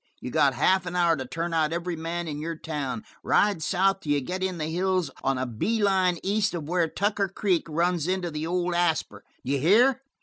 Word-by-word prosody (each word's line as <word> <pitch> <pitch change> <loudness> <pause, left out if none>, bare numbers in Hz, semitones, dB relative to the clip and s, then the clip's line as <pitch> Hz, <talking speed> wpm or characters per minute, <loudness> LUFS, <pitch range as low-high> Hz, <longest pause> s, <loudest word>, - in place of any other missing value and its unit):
You 125 - -6
got 140 -3 +3
half 185 -1 +2
an 175 - -4
hour 170 -2 +3
to 130 -3 -6
turn 165 +4 -3
out 160 -1 +2
every 170 +1 -2
man 165 +1 -4
in 150 -1 -4
your 165 +1 -3
town. 155 +5 -4 0.2
Ride 205 -5 +2
south 195 +4 +2
till 150 -6 -1
you 145 - +2
get 180 +8 -4
in 185 -1 -1
the 155 - -2
hills 180 -1 0
on 135 -1 +1
a 130 - -1
bee 205 - -1
line 185 -3 +3
east 205 0 +1
of 155 -4 -5
where 175 0 +1
Tucker 200 +3 0
Creek 185 -3 0
runs 170 +1 0
into 185 -2 -1
the 155 +1 -4
old 180 0 0
Asper. 165 -12 0 0.2
D'ye 140 +2 0
hear? 240 - +4
175 Hz, 215 wpm, -26 LUFS, 155-190 Hz, 0.2 s, hear